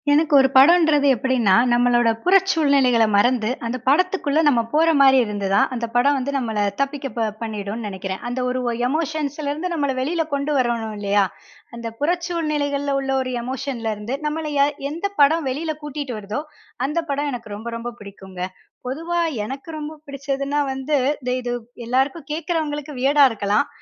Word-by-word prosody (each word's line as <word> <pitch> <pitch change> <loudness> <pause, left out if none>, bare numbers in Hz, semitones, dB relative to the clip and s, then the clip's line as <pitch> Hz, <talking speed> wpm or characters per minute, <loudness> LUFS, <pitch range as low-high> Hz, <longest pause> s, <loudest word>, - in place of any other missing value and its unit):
எனக்கு 305 +1 +3
ஒரு 265 -1 +6
படம்ன்றது 295 0 +6
எப்படின்னா, 240 -6 +2 0.2
நம்மளோட 240 -1 +3
புறச்சூழ்நிலைகளை 285 - +4
மறந்து 225 +1 +3 0.2
அந்த 235 +2 -2
படத்துக்குள்ள 330 -1 +2
நம்ம 250 -5 +4
போற 320 +2 +3
மாதிரி 265 -1 +7
இருந்து 205 -2 -3
தான் 200 - +4
அந்த 235 -1 -2
படம் 280 +4 +4
வந்து 270 +1 -2
நம்மள 225 -5 -2 0.2
தப்பிக்க 270 -5 -2
பண்ணிடும்னு 215 0 -4
நனைக்கிறேன். 190 -1 -5
அந்த 245 +1 -3
ஒரு 255 +1 -1 0.3
எமோஷன்ஸலருந்து 305 +2 -2
நம்மள 285 -4 0
வெளியில 325 +6 0
கொண்டு 280 +1 -1
வரணும் 235 -4 -1
இல்லயா, 200 0 +2 0.5
அந்த 235 0 -6
புறச்சூழ்நிலைகள்ல 300 -4 -1
உள்ள 270 0 -2
ஒரு 255 -1 -3
எமோஷன்லருந்து 240 -3 -4
நம்மள 305 +1 -2
யார் 285 +1 +3 0.2
எந்த 335 +6 -4
படம் 300 +2 +4
வெளியில 310 +5 -2
கூட்டிகிட்டு 290 -4 -5
வருதோ, 210 +6 -4 0.4
அந்த 300 +5 -1
படம் 290 +1 -1
எனக்கு 235 -4 -7
ரொம்ப, 220 +3 -8
ரொம்ப 240 +1 -5
பிடிக்குங்க. 190 -2 -10 0.5
பொதுவா 330 +6 -2 0.3
எனக்கு 270 +7 -7
ரொம்ப 300 +1 -6
பிடிச்சதுனா 275 +1 -2
வந்து 265 +3 -1 0.5
இது 245 -1 -3 0.3
எல்லாருக்கும் 270 +5 -1
கேட்கிறவங்களுக்கு 305 -3 -3
வியர்டா 280 +2 +5
இருக்கலாம். 210 +5 0
275 Hz, 145 wpm, -21 LUFS, 235-300 Hz, 0.5 s, மாதிரி